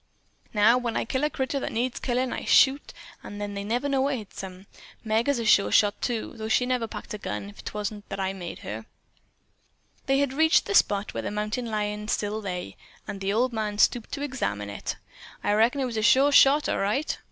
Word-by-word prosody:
Now, 220 +4 +4
when 240 -2 -2
I - - -1
kill 260 +4 -2
a - - +1
critter 275 0 -2
that - - -4
needs 245 +2 -1
killin', 250 0 -1
I - - -4
shoot 275 +1 +4 0.3
an' 205 - -8
they 205 -1 -4
never 240 +7 -1
know 275 -1 +1
what 275 +1 +1
hits 210 -3 -9
'em. 185 0 -9 0.4
Meg 225 +3 +1
is 280 - +2
a 230 - -3
sure 200 -2 +4
shot, 205 -1 +3
too, 235 -3 -2
though 220 0 -4
she'd 250 +3 +2
never 250 -3 0
pack - - -8
a 210 - -5
gun 105 - -5
if - - -14
'twant 210 0 -5
that 195 - -5
I 190 0 -1
make 180 -3 -7
her." 110 +1 -7 1.2
They 270 0 +3
had 280 -2 +1
reached 320 +3 +4
the - - -2
spot 205 - +2
where - - -3
the - - -3
mountain 215 +3 -3
lion 210 -1 -3
still 215 0 -1
lay, 180 -3 -5 0.3
and 195 - -6
the 195 +1 0
old 240 +4 +1
man 215 -2 -2
stooped 230 +1 +2
to 285 - -3
examine 105 - -3
it. 100 - -4 0.5
"I 205 - +2
reckon 230 +6 +3
that - - +1
was 235 -3 -4
a - - +1
sure 270 +6 +5
shot, 285 +1 +6
all - - 0
right." 230 +10 0
220 Hz, 220 wpm, -26 LUFS, 205-260 Hz, 1.2 s, shot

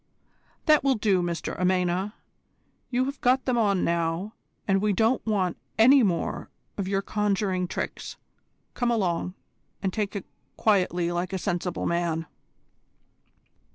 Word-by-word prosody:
"That 305 -2 +5
will 275 -1 +3
do, 205 -4 +2
Mr 170 -1 -3
Amena. 185 +2 +1 0.7
You've 260 +3 -1
got 255 +2 +3
them 255 - +1
on 200 -5 +2
now, 170 +4 -1 0.3
and 195 -1 +3
we 210 -1 +2
don't 225 +5 +2
want 190 -5 0 0.2
any 260 +5 +7
more 180 -7 -1 0.3
of 195 -2 -3
your 195 0 0
conjuring 200 -3 0
tricks. - - -5 0.6
Come 245 - 0
along, 180 -5 0 0.5
and 190 -1 0
take 210 -1 -2
it 200 - -4 0.3
quietly 180 -5 +2
like 175 +1 -2
a - - 0
sensible 180 -2 -2
man." 170 -1 0
195 Hz, 130 wpm, -26 LUFS, 180-220 Hz, 0.7 s, any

